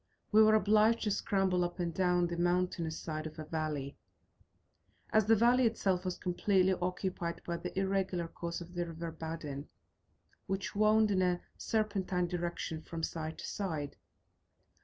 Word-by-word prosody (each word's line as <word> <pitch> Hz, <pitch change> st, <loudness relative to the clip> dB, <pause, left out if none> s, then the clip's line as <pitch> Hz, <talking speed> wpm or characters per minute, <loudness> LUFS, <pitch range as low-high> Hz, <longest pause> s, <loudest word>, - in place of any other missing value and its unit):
We 215 Hz, 0 st, +7 dB
were 215 Hz, 0 st, +7 dB
obliged 215 Hz, +2 st, +4 dB
to 210 Hz, -, +1 dB
scramble 195 Hz, -3 st, +1 dB
up 175 Hz, 0 st, -3 dB
and 170 Hz, -1 st, -1 dB
down 180 Hz, 0 st, +2 dB
the 170 Hz, 0 st, -3 dB
mountainous 175 Hz, -2 st, 0 dB
side 155 Hz, -1 st, -4 dB
of 155 Hz, +1 st, -11 dB
a 155 Hz, -, -6 dB
valley, 150 Hz, -3 st, -3 dB, 1.1 s
as 215 Hz, -1 st, +4 dB
the 225 Hz, -, +6 dB
valley 240 Hz, +3 st, +5 dB
itself 190 Hz, -5 st, 0 dB
was 185 Hz, -, -2 dB
completely 190 Hz, +1 st, +2 dB
occupied 180 Hz, -1 st, -3 dB
by 170 Hz, -1 st, -2 dB
the -, -, -6 dB
irregular 190 Hz, -3 st, 0 dB
course 170 Hz, +1 st, -5 dB
of 175 Hz, +1 st, -10 dB
the 175 Hz, -1 st, -2 dB
river 165 Hz, 0 st, -5 dB
Badin, 160 Hz, -3 st, -6 dB, 0.8 s
which 195 Hz, 0 st, -2 dB
wound 215 Hz, +1 st, +4 dB
in 190 Hz, -2 st, +2 dB
a 180 Hz, -1 st, +1 dB
serpentine 200 Hz, -5 st, 0 dB
direction 170 Hz, -2 st, -3 dB
from 165 Hz, 0 st, -6 dB
side 160 Hz, -1 st, -3 dB
to -, -, -7 dB
side. 160 Hz, -8 st, -3 dB
180 Hz, 160 wpm, -33 LUFS, 165-195 Hz, 1.1 s, We